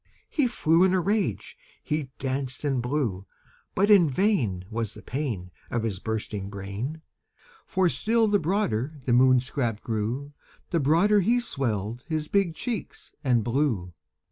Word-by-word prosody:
He 290 -6 +2
flew 165 -7 +3
in 190 0 +4
a - - +3
rage 200 +3 -1 0.3
he 150 -4 -2
danced 135 0 -3
and 135 -4 +1
blew; 120 -8 -2 0.5
But 200 +3 +3
in 180 -7 +7
vain 130 - +1
Was 110 -2 -3
the - - -11
pain 120 -10 -3 0.2
Of 120 -2 -1
his 105 -5 -2
bursting 105 -2 -3
brain; 105 +11 -5 0.6
For 185 -1 +2
still 225 +5 +2
the 205 -1 +3
broader 155 - 0
the 125 - +2
Moon 130 0 +6
scrap 120 -4 -2
grew, 120 +6 -3 0.4
The 170 - +2
broader 170 +9 +4
he 230 +6 +3
swelled 120 - -2
his 155 -2 -2
big 195 -4 +1
cheeks 230 - -5
and 120 -4 +3
blew. 115 - 0
135 Hz, 150 wpm, -26 LUFS, 115-180 Hz, 0.6 s, in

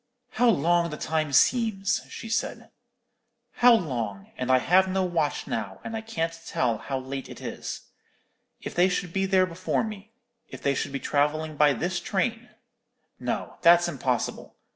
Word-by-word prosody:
"How 245 0 +3
long 170 -2 +3
the 150 - -6
time 155 -1 -1
seems!" 220 - +2
she 230 - -8
said; 225 - -3 0.9
"how 245 -1 +7
long! 115 - -3
and 130 0 -1
I 130 - +6
have 185 +8 +4
no 190 0 0
watch 165 -5 -1
now, 100 -4 -4
and 225 - -5
I 220 - -3
can't 190 -8 -2
tell 115 -4 0
how 135 - -3
late 135 +1 -6
it - - -9
is. - - -6 0.8
If - - -6
they 180 +2 +4
should 180 -2 -2
be 195 0 +1
there 190 -1 +4
before 185 +1 -1
me. 215 -1 -7 0.4
If - - -9
they 140 - +2
should 140 - -2
be 140 - -3
travelling 155 +2 0
by 150 -1 +5
this 175 +8 -2
train. 225 +6 -2 0.7
No, - - -4
that's 175 0 +6
impossible. 130 -6 -2
170 Hz, 165 wpm, -26 LUFS, 140-195 Hz, 0.9 s, how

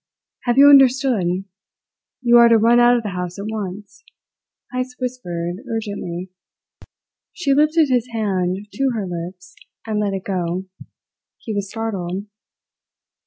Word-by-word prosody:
"Have 240 0 +1
you 280 +1 +8
understood? 265 -7 +5 1.0
You 240 -1 +6
are 235 0 +8
to 230 - +6
run 230 +2 +4
out 240 0 +5
of 235 - -3
the 210 - -3
house 180 -1 -5
at 200 - -6
once," 210 0 -6 0.7
Heyst 255 0 -3
whispered 180 -9 -4
urgently. 200 -5 -5 1.0
She 285 -6 0
lifted 305 +1 +3
his 250 -2 +1
hand 195 -3 -1
to 270 0 0
her 210 -3 -2
lips 180 +1 -7 0.3
and 215 -2 -2
let 200 -2 -1
it 190 - -5
go. 180 -1 -2 0.7
He 220 - -6
was 200 -1 -3
startled. 195 -4 -4
215 Hz, 135 wpm, -20 LUFS, 185-245 Hz, 1.0 s, you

